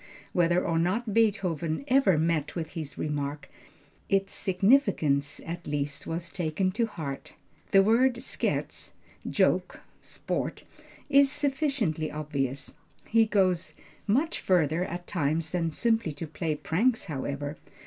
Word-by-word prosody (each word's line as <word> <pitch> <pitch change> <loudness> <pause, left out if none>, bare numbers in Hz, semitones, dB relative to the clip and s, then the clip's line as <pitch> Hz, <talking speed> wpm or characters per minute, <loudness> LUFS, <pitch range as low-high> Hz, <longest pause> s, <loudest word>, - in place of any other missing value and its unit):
Whether 175 0 +3
or 165 -1 +1
not 205 +6 0
Beethoven 195 - +1
ever 260 - +4
met 155 -2 0
with 160 -2 -4
this 155 -4 -5
remark, 145 -1 -3 0.6
its 195 0 +1
significance 185 - +2
at 170 +1 -6
least 145 0 -2
was 170 +1 -4
taken 180 +2 0
to 230 +4 0
heart. 150 -9 -6 0.4
The 195 0 +6
word 240 +5 +4
Scherz 240 - -2 0.4
joke, - - +1 0.2
sport, - - -4 0.4
is 275 0 +5
sufficiently 265 - 0
obvious. 140 -3 -3 0.4
He 225 0 +4
goes 185 -4 +1 0.3
much 285 +11 +1
farther 170 -2 +2
at 175 0 -6
times 160 -2 -1
than 170 -2 0
simply 225 0 +1
to 145 +3 -5
play 160 0 -2
pranks, 210 +11 +1
however. 145 -1 -4
170 Hz, 125 wpm, -28 LUFS, 155-215 Hz, 0.6 s, The